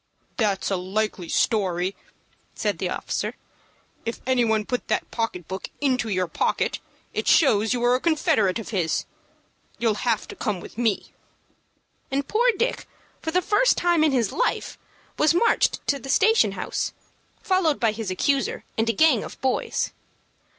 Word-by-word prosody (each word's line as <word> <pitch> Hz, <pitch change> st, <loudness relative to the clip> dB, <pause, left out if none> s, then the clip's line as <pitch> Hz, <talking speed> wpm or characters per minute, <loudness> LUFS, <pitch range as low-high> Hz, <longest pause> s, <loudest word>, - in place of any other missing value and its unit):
"That's 205 Hz, -4 st, 0 dB
a 195 Hz, -, +1 dB
likely 190 Hz, -1 st, -2 dB
story," 190 Hz, -4 st, +1 dB, 0.6 s
said -, -, -1 dB
the -, -, -1 dB
officer. -, -, -3 dB, 0.7 s
"If 230 Hz, -, -4 dB
any 255 Hz, -1 st, +3 dB
one 220 Hz, -2 st, +1 dB
put 250 Hz, +2 st, -3 dB
the -, -, +2 dB
pocket 225 Hz, -7 st, -3 dB
book 190 Hz, +1 st, -5 dB
into 255 Hz, -6 st, +1 dB
your 185 Hz, -2 st, +1 dB
pocket, -, -, 0 dB, 0.3 s
it -, -, -2 dB
shows 220 Hz, -8 st, +4 dB
you 245 Hz, -1 st, 0 dB
were 245 Hz, +1 st, +4 dB
a 250 Hz, -, +2 dB
confederate 310 Hz, -, +2 dB
of 225 Hz, -, -7 dB
his. 180 Hz, -7 st, 0 dB, 0.7 s
You'll 225 Hz, -3 st, 0 dB
have 225 Hz, -3 st, 0 dB
to -, -, -7 dB
come 205 Hz, -4 st, -2 dB
with -, -, -11 dB
me." 225 Hz, -3 st, -1 dB, 1.0 s
And 275 Hz, +1 st, -1 dB
poor 480 Hz, +3 st, +3 dB
Dick, 480 Hz, +4 st, -1 dB, 0.3 s
for 320 Hz, -, -3 dB
the 360 Hz, +3 st, +1 dB
first -, -, +3 dB
time 345 Hz, -3 st, +3 dB
in 310 Hz, -, +4 dB
his 240 Hz, -6 st, +1 dB
life, -, -, -1 dB, 0.4 s
was 310 Hz, +2 st, +4 dB
marched 465 Hz, +7 st, +2 dB
to 280 Hz, -, +2 dB
the 270 Hz, -, -9 dB
station 445 Hz, -, +4 dB
house, -, -, -3 dB, 0.5 s
followed 370 Hz, -6 st, +2 dB
by 230 Hz, -3 st, +3 dB
his 215 Hz, -2 st, -5 dB
accuser, 270 Hz, +9 st, 0 dB, 0.2 s
and 225 Hz, +1 st, +2 dB
a -, -, +2 dB
gang 310 Hz, -7 st, +4 dB
of -, -, -9 dB
boys. 260 Hz, -1 st, -1 dB
235 Hz, 165 wpm, -24 LUFS, 205-305 Hz, 1.0 s, shows